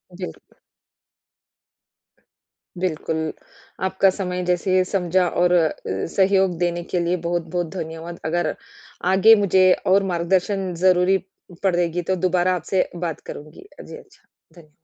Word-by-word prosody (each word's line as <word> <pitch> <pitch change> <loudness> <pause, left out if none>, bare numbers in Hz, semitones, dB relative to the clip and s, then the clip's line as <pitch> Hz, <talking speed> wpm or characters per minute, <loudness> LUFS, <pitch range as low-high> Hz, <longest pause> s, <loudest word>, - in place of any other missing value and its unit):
जी, 185 0 -5
बिल्कुल। - - -13 2.2
बिल्कुल। 160 -3 -2 0.5
आपका 190 +1 +3
समय 180 -1 -3
जैसे 185 +1 +2
समझा 180 -1 +1
और 175 +1 +1
अ, 165 -3 +4 0.2
सहयोग 190 - +1
देने 175 -1 -1
के 180 - -2
लिए 170 +1 0
बहुत-बहुत 175 0 -2
धन्यवाद। 165 0 -6
अगर 175 +2 -1 0.6
आगे 220 +4 +7
मुझे 185 0 +5 0.2
और 195 +1 +4
मार्गदर्शन 185 +2 0
ज़रूरी 185 +1 +4 0.5
पड़ेगी 175 -2 +1
तो - - +2
दोबारा 185 0 +1
आपसे 180 +2 -1 0.2
बात 165 -4 -4
करुँगी। 155 - -10 0.2
जी - - -9
अच्छा, - - -19 0.3
धन्य 165 -3 -16
180 Hz, 120 wpm, -22 LUFS, 170-185 Hz, 2.2 s, आगे